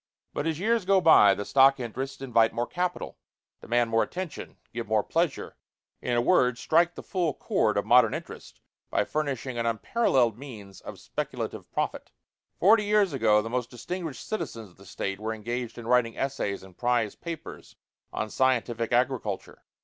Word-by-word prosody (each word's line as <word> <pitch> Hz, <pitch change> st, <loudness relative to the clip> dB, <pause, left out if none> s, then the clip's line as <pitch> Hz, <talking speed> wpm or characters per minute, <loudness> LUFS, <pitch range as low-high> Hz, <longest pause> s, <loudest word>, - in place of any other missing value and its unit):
But 145 Hz, -, -2 dB
as 160 Hz, -1 st, -1 dB
years 225 Hz, +2 st, +1 dB
go 195 Hz, +1 st, +4 dB
by, 105 Hz, -, +7 dB
the 100 Hz, -, -5 dB
stock 135 Hz, +2 st, +5 dB
interests 130 Hz, +3 st, -5 dB
invite 115 Hz, -3 st, +3 dB
more 120 Hz, -, -1 dB
capital, 180 Hz, +5 st, -3 dB, 0.4 s
demand 120 Hz, 0 st, +1 dB
more 115 Hz, 0 st, +3 dB
attention, 180 Hz, -4 st, -5 dB, 0.2 s
give 115 Hz, -1 st, -4 dB
more 110 Hz, -1 st, +2 dB
pleasure 165 Hz, 0 st, -1 dB, 0.4 s
in 125 Hz, -, -1 dB
a -, -, +3 dB
word, 125 Hz, -7 st, +3 dB
strike 170 Hz, +6 st, +2 dB
the -, -, -8 dB
full 175 Hz, -7 st, -1 dB
chord -, -, 0 dB
of -, -, 0 dB
modern -, -, +5 dB
interest -, -, -9 dB, 0.3 s
by -, -, +1 dB
furnishing 135 Hz, -5 st, -3 dB
an 115 Hz, -, 0 dB
unparalleled 120 Hz, -, +1 dB
means 105 Hz, -9 st, -10 dB
of -, -, -9 dB
speculative -, -, -5 dB
profit. -, -, -3 dB, 0.5 s
Forty 210 Hz, +3 st, +5 dB
years 205 Hz, -4 st, +3 dB
ago 110 Hz, -5 st, +3 dB
the 115 Hz, -, -5 dB
most 125 Hz, -1 st, -2 dB
distinguished 160 Hz, +2 st, -6 dB
citizens 120 Hz, -, -5 dB
of -, -, -25 dB
the 100 Hz, 0 st, -16 dB
State 100 Hz, +1 st, -4 dB
were 110 Hz, +1 st, -3 dB
engaged 120 Hz, +2 st, -5 dB
in 120 Hz, -, -8 dB
writing 120 Hz, -1 st, +2 dB
essays 135 Hz, -8 st, -2 dB
and 95 Hz, -2 st, -15 dB
prize 120 Hz, -2 st, 0 dB
papers 170 Hz, -2 st, -8 dB, 0.4 s
on 110 Hz, -1 st, -3 dB
scientific 120 Hz, -3 st, 0 dB
agriculture. 120 Hz, -5 st, -1 dB
125 Hz, 170 wpm, -27 LUFS, 115-160 Hz, 0.5 s, by